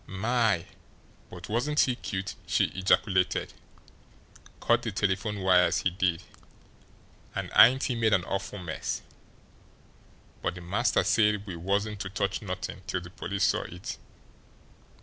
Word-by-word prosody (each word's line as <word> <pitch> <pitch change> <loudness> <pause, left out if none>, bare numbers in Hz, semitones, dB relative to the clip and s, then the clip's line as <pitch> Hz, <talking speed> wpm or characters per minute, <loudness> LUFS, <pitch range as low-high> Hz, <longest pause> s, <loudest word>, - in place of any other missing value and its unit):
"My, 110 -2 +1 0.6
but 90 -1 -9
wasn't 125 +7 +1
he 125 - +2
cute!" 95 -5 -4
she - - +2
ejaculated. 95 0 +1 1.1
"Cut - - +3
the - - -3
telephone 100 +1 -1
wires, 90 -1 +4
he 95 - +2
did. 90 -2 0 1.1
And - - -4
ain't 130 +3 +7
he 130 - 0
made 115 -2 +1
an 90 -4 +2
awful 100 +1 -4
mess! 85 -4 -4 1.4
But 90 - -2
the 90 - -9
master 100 +6 +1
said 105 +2 +2
we 95 -4 -6
wasn't 100 +4 -1
to 95 - -4
touch 95 0 -2
nothing 95 -2 -5
till 90 - -2
the 85 0 -11
police 95 +2 -3
saw - - +3
it." 90 +2 -7
95 Hz, 135 wpm, -28 LUFS, 90-105 Hz, 1.4 s, ain't